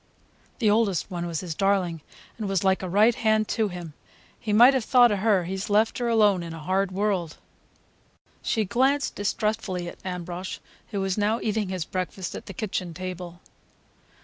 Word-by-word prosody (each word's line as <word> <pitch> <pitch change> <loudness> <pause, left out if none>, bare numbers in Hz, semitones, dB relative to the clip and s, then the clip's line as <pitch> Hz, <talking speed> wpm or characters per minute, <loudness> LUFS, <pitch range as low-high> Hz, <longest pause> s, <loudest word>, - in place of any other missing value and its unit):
The 225 - +1
oldest 205 -4 +2
one 175 -1 -3
was 165 -2 -3
his 175 -3 -4
darling, 185 -3 +1 0.4
and 210 -3 -3
was 195 -1 0
like 190 0 +2
a 185 - -4
right 210 +6 +5
hand 215 -1 +1
to 220 -2 +1
him. 175 -4 -7 0.5
He 215 - -3
might 240 +6 +7
have 260 -3 +1
thought 245 -1 +5
of 205 - 0
her. 200 -3 +3
He's 190 +3 -4
left 215 +4 +2
her 240 - -1
alone 210 -5 +4
in 165 -1 -6
a - - -8
hard 190 +4 0
world." 185 -4 -1 1.0
She 220 -2 0
glanced 265 +7 +1
distrustfully 205 -3 -2
at - - -9
Ambrosch, 180 0 -5 0.3
who 200 -3 -2
was 195 +1 -1
now 215 +3 +1
eating 215 -2 -1
his 185 -4 -3
breakfast 185 0 -4
at - - -8
the 195 - -7
kitchen 185 -5 -3
table. 180 -1 -7
195 Hz, 180 wpm, -25 LUFS, 180-215 Hz, 1.0 s, might